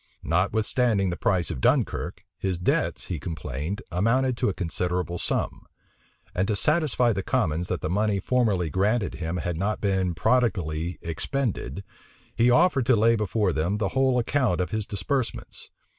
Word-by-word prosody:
Notwithstanding 100 +3 +1
the - - -2
price 90 -2 +1
of 65 - -5
Dunkirk, - - 0
his 95 -2 -2
debts, 90 - 0
he 85 - -4
complained, 80 +3 -4
amounted 125 +7 +2
to 125 - +1
a - - -2
considerable 90 -1 -2
sum; - - -2 0.7
and 95 +2 0
to 105 - +1
satisfy 150 -3 +2
the 95 - -2
commons 85 -2 0
that 90 - -2
the - - -2
money 105 +1 +1
formerly 100 - +1
granted 100 +2 +1
him 85 +1 -3
had 85 0 -2
not 100 +4 -1
been 95 -4 0
prodigally 90 -8 0
expended, 100 - -3 0.5
he 120 +2 +4
offered 135 -1 +3
to 125 - +6
lay 115 +2 +4
before 105 -3 0
them 90 +7 0
the 100 -2 0
whole 130 +1 +2
account 125 -6 +1
of 90 - -1
his 110 -2 -2
disbursements. 115 +6 -3
100 Hz, 160 wpm, -26 LUFS, 90-120 Hz, 0.7 s, to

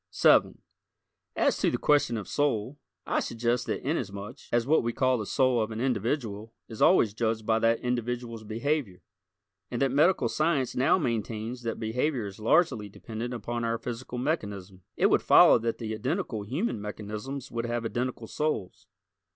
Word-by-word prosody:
7 - - +4 0.8
As - - +2
to - - +3
the - - -1
question 145 -6 +2
of 105 - -6
soul, 140 -2 -1 0.3
I - - +1
suggest 120 +1 -1
that - - -3
inasmuch 100 - -3
as 120 -1 +2
what 155 +4 +4
we 120 0 -2
call 130 -2 +2
the 105 - -4
soul 130 -3 +2
of 110 - -1
an 110 0 -5
individual 115 -3 -2
is 110 - -9
always 115 - +5
judged 110 -1 -1
by 110 0 +2
that 115 0 +2
individual's 120 -2 -3
behavior, 115 -2 -2 0.7
and 120 - -3
that 135 -2 +2
medical 145 -1 +3
science 150 -1 0
now 130 +7 +4
maintains 115 - -3
that 115 -1 -4
behavior 120 +2 -1
is 100 +1 -8
largely 110 -3 +2
dependent 115 +4 -6
upon 120 +1 -4
our 115 0 0
physical 125 +1 -6
mechanism, 100 - -3 0.2
it - - +2
would - - +4
follow - - +7
that 115 0 -2
the 110 -2 -4
identical 125 - -2
human 130 - -2
mechanisms 110 +6 -6
would 115 0 -3
have 120 -1 -2
identical 120 0 -3
souls. 115 -8 -3
115 Hz, 165 wpm, -28 LUFS, 110-130 Hz, 0.8 s, follow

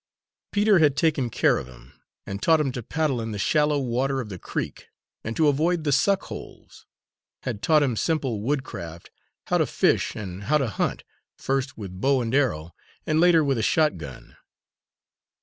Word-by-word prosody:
Peter 205 -2 +4
had 145 -4 +3
taken 140 -4 +1
care - - +2
of - - -8
him, 60 -2 -16 0.3
and 100 +1 -6
taught 160 -1 +4
him 140 -3 0
to 125 - -5
paddle 135 0 -1
in 115 - -4
the 105 - -4
shallow 150 +7 +2
water 135 +1 -1
of 120 -5 -5
the 90 -3 -7
creek - - -5 0.4
and 115 +1 -4
to 155 - +4
avoid 160 +4 +1
the 145 - 0
suck 195 +8 +2
holes; - - -11 0.6
had 115 -5 -4
taught 155 -2 +4
him 130 -5 0
simple 130 -6 -1
woodcraft, 105 - -4 0.3
how - - +1
to - - +2
fish, - - +1
and 100 -2 -7
how 150 +6 +3
to 135 -5 -1
hunt, 95 - -2 0.3
first 135 0 -2
with 95 -3 -8
bow 135 +1 +3
and 120 -1 -2
arrow, 100 - +1 0.3
and 155 +1 +1
later 170 -2 +5
with 135 -4 0
a - - 0
shotgun. 90 - -1
135 Hz, 180 wpm, -25 LUFS, 110-150 Hz, 0.6 s, later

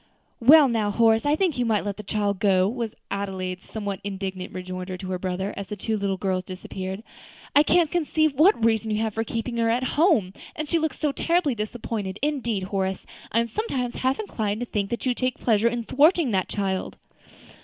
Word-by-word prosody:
"Well 285 +4 +8
now, 225 -4 0
Horace, 225 +3 +3
I 295 - +4
think 330 -5 0
you 245 - +2
might 215 -3 +1
let 200 -1 -2
the 210 - -7
child 205 -1 -1
go," 190 -2 +3
was 230 0 -3 0.2
Adelaide's 190 -2 -4
somewhat 205 -3 -4
indignant 190 -2 -5
rejoinder 185 0 -5
to 185 - -7
her 185 - -2
brother, 190 +2 -3
as 200 -1 -6
the 210 - -5
two 220 +2 -2
little 200 -2 -1
girls 185 -1 -1
disappeared; 190 +2 -6 0.5
"I 290 - +8
can't 330 +1 +3
conceive 310 -3 +1
what 310 - +4
reason 225 -1 +2
you 210 - 0
can 220 - 0
have 220 -2 -2
for 225 - -1
keeping 230 +1 -4
her 230 -1 +2
at 240 +3 +1
home, 295 - +3 0.2
and 310 - -4
she 335 - +1
looks 315 -3 -2
so 300 -2 +1
terribly 335 0 +1
disappointed. 215 -3 -4
Indeed, 240 -9 -1
Horace, 190 0 -2 0.3
I 230 - +3
am 235 - -2
sometimes 255 - -2
half 260 +2 0
inclined 220 - -2
to - - -1
think 210 +1 -3
you 255 - +2
take 255 0 -2
pleasure 225 -1 +2
in 235 0 -1
thwarting 300 +3 +3
that 190 -3 0
child." 195 -2 -2
220 Hz, 205 wpm, -25 LUFS, 195-255 Hz, 0.5 s, Well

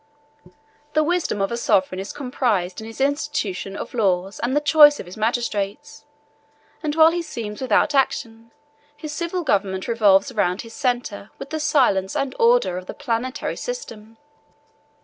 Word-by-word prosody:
The 310 - +3
wisdom 335 - 0
of 195 - -1
a 235 - -2
sovereign 190 -5 +1
is 195 - -5
comprised 225 -9 -1
in 220 - -8
the 225 +4 -2
institution 280 -10 -2
of - - -7
laws 195 -4 0
and 245 +3 -1
the - - +4
choice 295 0 +6
of 180 0 -8
magistrates, 215 -3 -2 0.8
and 300 -2 -2
while 320 0 +7
he 345 +1 -1
seems 220 -9 -6
without 265 +3 +2
action, 230 -4 -1 0.5
his 305 -2 -7
civil 340 +3 -3
government 195 -7 0
revolves 215 0 +3
round 185 -2 0
his 230 -1 -12
centre 245 -6 -2
with 275 - -9
the 315 - -2
silence 255 -10 +2
and 275 -3 -1
order 465 - +3
of 185 - -13
the - - -7
planetary 255 +2 -3
system. 225 - -7
235 Hz, 155 wpm, -22 LUFS, 200-295 Hz, 0.8 s, while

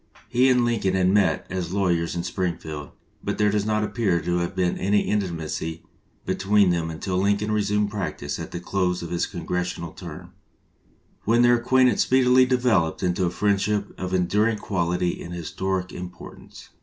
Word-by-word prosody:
He 125 +2 +4
and 125 -2 +4
Lincoln 105 -5 0
had 90 -1 +3
met 95 -5 +2
as 90 -2 -3
lawyers 85 -4 0
in 85 - -2
Springfield, 85 -5 -4 0.3
but - - -2
there 105 -1 +3
does 105 0 0
not 110 0 +1
appear 105 -5 0
to 90 +1 -1
have 85 0 -3
been 90 -1 +1
any 100 +2 +2
intimacy 85 -4 -3 0.4
between 100 -1 +3
them 85 -1 -1
until 90 +4 -3
Lincoln 100 +2 +1
resumed 105 -1 +1
practice 95 -7 -4
at - - -6
the 85 - -5
close 90 -1 -1
of 85 - -7
his 85 0 0
congressional 90 -1 -3
term, 90 +1 -10 0.9
when 120 +3 +4
their 120 0 +5
acquaintance 125 +1 +3
speedily 130 0 +4
devel 125 -9 +3
oped 80 - -7
into 90 0 +1
a - - +1
friendship 100 +2 0
of 90 0 -4
enduring 105 +5 +2
quality 90 -3 -1
and 90 +1 -7
historic 95 +2 -3
importance. 90 0 -10
95 Hz, 170 wpm, -24 LUFS, 85-105 Hz, 0.9 s, their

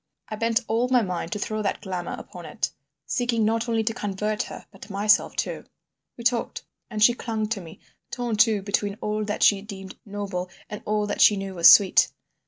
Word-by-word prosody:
I 215 - -4
bent 230 +1 +1
all 230 +3 +1
my 250 -2 +3
mind 180 -3 -4
to - - -3
throw 215 +1 -3
that 200 - -2
glamour 180 -3 -4
upon - - -10
it, - - -3 0.3
seeking 240 -3 0
not 225 +2 0
only 225 -1 +1
to 225 +1 -1
convert 210 -1 -2
her - - -7
but - - -13
myself 205 +2 +2
to - - -2
that. - - -28 0.5
We 235 - -8
talked, 235 0 0 0.3
and 215 0 0
she 240 - +7
clung 220 -3 -3
to 215 -3 -2
me, 165 -2 -12 0.3
torn 240 -3 -2
too 215 -2 +3
between 200 0 -1
all 215 0 -2
that 210 +1 -2
she 200 -2 +5
deemed 195 -2 -9
noble 200 -3 -5 0.2
and 210 - -6
all 210 0 0
that 205 - -2
she 210 - +6
knew 195 0 -5
was 170 -2 +7
sweet. 200 -3 +6
210 Hz, 205 wpm, -25 LUFS, 200-225 Hz, 0.5 s, she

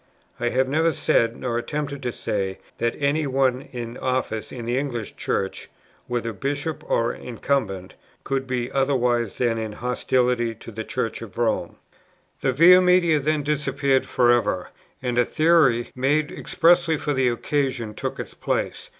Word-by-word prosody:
I 120 0 +1
have 130 +2 +1
never 160 +4 +2
said, 115 -5 +1
nor 120 -2 -2
attempted 140 +2 -4
to 125 -2 -2
say, 95 -4 -3 0.2
that 120 0 0
any 145 +1 +1
one 130 -1 0
in 120 -1 -6
office 125 -4 -2
in 120 -2 -6
the 120 +1 -1
English 125 -6 -3
Church, 95 0 -3 0.4
whether 120 -2 -2
Bishop 145 +7 -3
or 115 0 +1
incumbent, 110 -6 -2 0.3
could 135 -1 -2
be 125 -1 -2
otherwise 125 -5 +1
than 115 -2 +1
in 110 -1 -4
hostility 125 0 0
to 115 - -11
the 110 +1 -5
Church 115 -1 -3
of 115 -3 -10
Rome." 120 -1 0 0.6
The 130 - +1
Via 175 +7 +7
Media 180 -4 +4
then 150 +1 0
disappeared 140 -2 +1
for 120 -1 +3
ever, 105 -6 +1 0.3
and 125 -1 0
a - - +6
Theory, 155 -5 +3
made 145 +4 +1
expressly 170 -1 +3
for 145 0 -2
the 130 -2 +2
occasion, 125 -2 -1
took - - -4
its - - -6
place. - - -3
125 Hz, 160 wpm, -23 LUFS, 115-145 Hz, 0.6 s, Via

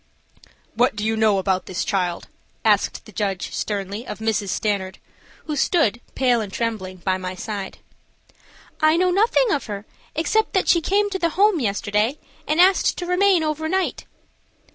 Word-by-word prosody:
"What 240 +1 +2
do 210 0 -3
you 225 0 +1
know 220 -2 +3
about 190 -1 0
this 185 - -3
child?" 180 -3 -1 0.4
asked - - +2
the - - -13
judge, 195 -3 -3
sternly, 205 +2 -3
of 210 - -5
Mrs. 220 -2 -1
Stanard, 190 -2 -1 0.5
who 305 - -3
stood, 270 - +2
pale 250 -3 +2
and 205 -3 -6
trembling, 200 -5 -3
by 185 -1 +2
my 185 0 -5
side. 200 0 -5 1.0
"I 310 +1 +4
know 365 +1 +3
nothing 445 +4 +3
of 285 - -1
her 205 -1 -6 0.3
except 435 +8 +1
that 380 - +1
she 340 - +4
came 405 +4 +1
to 380 - -2
the 335 - +1
home 405 -3 +4
yesterday 210 +2 0 0.3
and 305 +3 +1
asked 375 +1 +4
to 355 - -4
remain 360 -1 +3
overnight." 315 +5 -1
230 Hz, 165 wpm, -22 LUFS, -, 1.0 s, I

